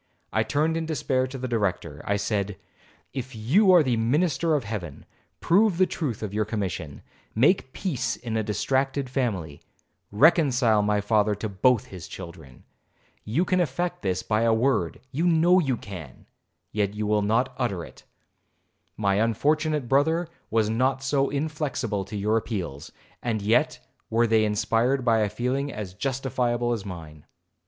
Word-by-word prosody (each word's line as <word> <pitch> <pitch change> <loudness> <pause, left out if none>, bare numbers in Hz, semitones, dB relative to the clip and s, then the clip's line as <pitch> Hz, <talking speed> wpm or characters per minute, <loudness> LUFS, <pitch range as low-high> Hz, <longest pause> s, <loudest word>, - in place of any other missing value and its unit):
I - - +3
turned 155 +3 0
in 165 -1 -3
despair 130 -4 0
to 130 +1 -7
the 130 0 -4
Director. 105 -7 -2
I 100 - +1
said, 100 -1 -2 0.6
'If 130 -1 -5
you 165 - +4
are 175 -3 +7
the 125 -4 +1
minister 155 +7 +1
of 140 - 0
Heaven, 100 -9 -6 0.4
prove 195 +1 +3
the 185 - +5
truth 135 - -4
of 105 -2 -4
your 105 +1 +1
commission,—make 105 - -1
peace 135 - -2
in 115 -2 -5
a 110 - +1
distracted 130 +5 -1
family, 100 - -2 0.5
reconcile 125 - +4
my 105 0 +1
father 105 0 +2
to 105 +2 -4
both 110 +3 +2
his 90 -1 -9
children. 85 -8 -11 0.6
You 145 - +1
can 185 0 +1
effect 175 +2 -1
this 95 -2 -1
by 110 0 +1
a 115 0 +3
word, 110 -8 0
you 160 +6 0
know 175 +2 +5
you 135 -8 0
can, 90 -12 -10 0.5
yet 105 -1 -1
you 105 0 -2
will 105 0 +2
not 120 +5 +1
utter 100 -10 -1
it. - - -16 0.9
My 100 -2 +1
unfortunate 150 +5 +1
brother 160 +6 +2 0.2
was 110 -2 +2
not 130 +4 0
so 135 0 +1
inflexible 140 -9 -2
to 105 +2 -6
your 105 +3 +1
appeals, 90 - -4 0.3
and 115 -3 -1
yet 110 +4 +2 0.3
were 115 +1 +3
they 110 -1 +3
inspired 115 +5 +1
by 115 -2 +4
a 105 -1 +1
feeling 130 +6 -2
as 100 -4 -6
justifiable 120 0 -1
as 105 -3 -5
mine.' 80 -5 -9
115 Hz, 160 wpm, -25 LUFS, 105-140 Hz, 0.9 s, are